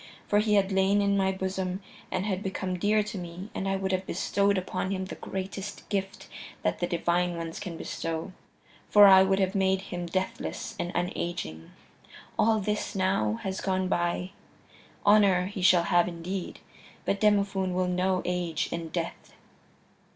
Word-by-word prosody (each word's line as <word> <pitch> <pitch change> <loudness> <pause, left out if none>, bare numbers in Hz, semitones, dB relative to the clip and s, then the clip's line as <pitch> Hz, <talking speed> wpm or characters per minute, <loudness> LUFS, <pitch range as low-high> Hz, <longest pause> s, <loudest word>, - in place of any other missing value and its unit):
For 205 - +3
he 210 0 +2
had 200 -1 +3
lain 195 +1 +3
in 200 0 +2
my 190 -1 +2
bosom 190 -1 -3 0.3
and 185 +1 -1
had 190 -2 -1
become 190 -2 -3
dear 210 +3 +3
to 210 -1 -5
me 180 +4 -8
and 195 - -3
I 195 - +1
would 190 0 -1
have 185 0 -1
bestowed 200 0 +1
upon 185 0 -2
him 190 -1 -2
the - - -7
greatest 195 +1 -6
gift 195 -2 -3 0.4
that - - 0
the 175 - 0
Divine 175 0 0
Ones 165 -1 -5
can 175 -4 -6
bestow, 165 +3 -4 0.6
for 205 -1 +8
I 190 -1 +9
would 190 0 +3
have 190 -1 +1
made 190 -1 +2
him 175 -1 -3
deathless 185 +2 -3
and 175 - -2
unaging. 170 - -3 0.7
All 220 0 +4
this, 210 0 -2
now, 185 - +1
has 190 0 -3
gone 185 -1 0
by. 175 +1 0 0.7
Honor 200 -3 +5
he 195 0 -5
shall 180 -1 +5
have 175 0 +3
indeed, 180 +2 -5 0.4
but 200 - 0
Demophoon 200 -3 +2
will 185 0 +1
know 185 +1 +1
age 175 -3 -1
and 165 -1 -4
death." 170 -1 -4
190 Hz, 165 wpm, -28 LUFS, 180-195 Hz, 0.7 s, I